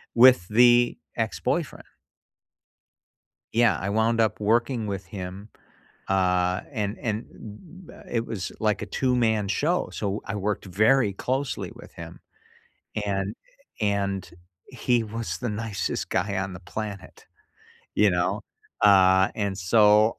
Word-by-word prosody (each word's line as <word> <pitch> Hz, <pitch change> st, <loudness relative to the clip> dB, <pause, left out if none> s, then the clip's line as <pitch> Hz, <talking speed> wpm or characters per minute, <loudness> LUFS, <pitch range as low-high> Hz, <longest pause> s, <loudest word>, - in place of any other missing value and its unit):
with 125 Hz, -7 st, +7 dB
the 120 Hz, +2 st, +5 dB, 0.2 s
ex-boyfriend. -, -, -2 dB, 1.7 s
Yeah, 115 Hz, 0 st, +4 dB
I 95 Hz, -, -3 dB
wound 110 Hz, +2 st, +1 dB
up 110 Hz, -1 st, +1 dB
working 115 Hz, +2 st, +1 dB
with 100 Hz, -2 st, -4 dB
him, 95 Hz, +2 st, -8 dB, 0.6 s
uh, 90 Hz, -1 st, +1 dB
and 105 Hz, -5 st, -3 dB
and 110 Hz, 0 st, -3 dB
m 165 Hz, -, -13 dB
m -, -, -13 dB
it 115 Hz, -1 st, -1 dB
was 100 Hz, -6 st, -5 dB
like 105 Hz, -3 st, 0 dB
a -, -, -3 dB
2 130 Hz, -1 st, 0 dB
man 110 Hz, -4 st, +1 dB
show, 160 Hz, -, 0 dB
so 100 Hz, 0 st, -3 dB
I -, -, -4 dB
worked 105 Hz, 0 st, -2 dB
very 110 Hz, +4 st, +3 dB
closely 130 Hz, +6 st, -3 dB
with -, -, -14 dB
him. 85 Hz, 0 st, -10 dB, 0.9 s
And 100 Hz, 0 st, -2 dB, 0.5 s
and, 100 Hz, -2 st, -1 dB, 0.4 s
he 120 Hz, -2 st, 0 dB
was 110 Hz, -5 st, -4 dB
the 120 Hz, -, -3 dB
nicest 105 Hz, -2 st, -3 dB
guy 100 Hz, +2 st, -1 dB
on 95 Hz, 0 st, -3 dB
the 95 Hz, -, -8 dB
planet, 100 Hz, 0 st, -7 dB, 0.7 s
you 105 Hz, -1 st, +4 dB
know? 90 Hz, 0 st, 0 dB, 0.4 s
Uh, 95 Hz, -1 st, +6 dB
and 100 Hz, -2 st, -2 dB
so, 105 Hz, +3 st, +4 dB
105 Hz, 130 wpm, -25 LUFS, 95-115 Hz, 1.7 s, with